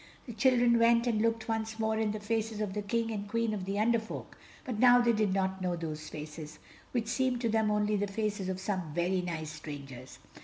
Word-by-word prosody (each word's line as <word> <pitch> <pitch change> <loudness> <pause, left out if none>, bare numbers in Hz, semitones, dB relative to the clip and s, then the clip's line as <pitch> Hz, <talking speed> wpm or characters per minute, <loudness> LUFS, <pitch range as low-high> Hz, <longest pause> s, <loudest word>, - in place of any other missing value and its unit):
The 240 - -7
children 240 0 +4
went, 235 0 +5
and 225 -3 +1
looked 230 0 0
once 220 -1 -2
more 220 0 0
in 220 -1 +1
the 215 - -4
faces 220 0 -2
of 210 -3 -2
the 210 - -2
King 230 +3 -1
and 205 -2 -4
Queen 230 0 0
of 195 -3 -3
the 195 +1 -2
Under 230 +2 +3
Folk, 220 - -8 0.3
but 245 -6 -3
now 245 0 +7
they 240 -1 +3
did 210 -3 +1
not 190 0 0
know 180 -1 0
those 155 -2 -5
faces, 150 0 -8 0.3
which 240 -3 0
seemed 255 +1 0
to 230 - +1
them 220 -1 +2
only 210 0 +1
the 205 +1 0
faces 205 -1 -2
of 185 0 -3
some 185 -6 -3
very 180 +2 +1
nice 160 -3 -4
strangers. 140 -4 -9
210 Hz, 225 wpm, -31 LUFS, 185-230 Hz, 0.3 s, now